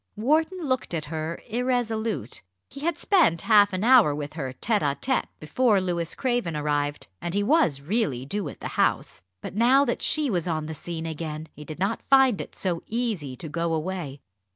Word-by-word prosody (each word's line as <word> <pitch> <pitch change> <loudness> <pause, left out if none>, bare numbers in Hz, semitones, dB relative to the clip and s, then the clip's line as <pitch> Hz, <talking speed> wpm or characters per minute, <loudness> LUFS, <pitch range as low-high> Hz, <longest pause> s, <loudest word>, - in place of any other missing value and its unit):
Wharton 315 - +1
looked 255 -9 -1
at 155 -2 -3
her 160 +1 -3
irresolute. 225 - -1 0.3
He 275 - -9
had 320 +2 -1
spent 335 - +3
half 205 -2 +5
an 185 +1 -2
hour 235 - +6
with 145 0 -5
her 135 -5 -4
tête 210 - 0
à 140 -1 -1
tête 260 0 0
before 210 +7 +2
Louis 175 -3 -2
Craven 240 - -1
arrived, 145 -1 -1 0.2
and 175 +1 -3
he 205 - +2
was 240 - +3
really 150 - -1
due 200 +8 -3
at - - -12
the - - -4
House. - - 0 0.2
But - - -7
now 250 +6 +4
that 240 - -2
she 305 -2 +2
was 175 -3 -1
on 155 -2 -1
the 160 - -5
scene 165 +1 -5
again, 155 -1 -5
he 150 - -10
did 155 0 -8
not 195 +6 -1
find 265 -5 +4
it - - -10
so 175 -3 -2
easy 215 - -2
to 160 - -8
go 165 +1 -1
away. 155 -4 -4
185 Hz, 195 wpm, -25 LUFS, 155-240 Hz, 0.3 s, hour